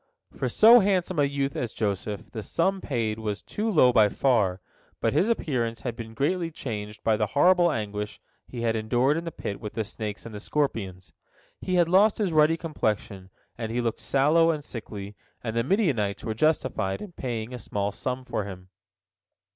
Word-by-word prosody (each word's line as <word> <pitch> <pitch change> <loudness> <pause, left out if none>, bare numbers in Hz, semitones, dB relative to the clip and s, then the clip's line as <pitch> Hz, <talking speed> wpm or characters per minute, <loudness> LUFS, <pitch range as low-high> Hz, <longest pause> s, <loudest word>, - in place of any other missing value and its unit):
For - - -1
so 230 +3 +8
handsome 185 -4 +1
a 145 - +5
youth 140 -1 -2
as 120 -3 -3
Joseph 105 -1 -3
the 110 - -5
sum 190 - 0
paid 115 -5 -2
was 105 -2 -4
too 215 +2 -2
low 130 - +5
by 105 -2 +5
far, 105 -7 +1 0.4
but - - +1
his 200 - +2
appearance 120 - -1
had 120 -3 -4
been 110 -1 -8
greatly 165 +6 0
changed 105 -8 -6
by 110 - +3
the 105 -1 +1
horrible 175 +2 +5
anguish 105 -2 -4 0.3
he 120 - -6
bad 115 -1 +1
endured 120 +6 +2
in 165 +1 -3
the 165 - -4
pit 100 -8 -6
with 105 -2 -6
the 110 - -1
snakes 105 -1 -6
and 115 - -8
the 105 - -6
scorpions. 95 - -2 0.5
He 185 - -2
had 175 -2 +4
lost 195 +4 +4
his 195 -6 0
ruddy 155 +1 +4
complexion, 105 - -3 0.3
and 110 -1 -3
he 120 - -1
looked 115 -2 -1
sallow 145 +8 +3
and 155 -3 -1
sickly, 105 -5 -7 0.3
and 115 -2 -3
the 115 - +2
Midianites 130 - 0
were 110 - -2
justified 110 -8 0
in 205 - -8
paying 120 -6 -4
a 125 - -5
small 100 -2 -2
sum 130 +4 -4
for 115 -5 -2
him. 90 -2 -9
120 Hz, 190 wpm, -26 LUFS, 105-160 Hz, 0.5 s, so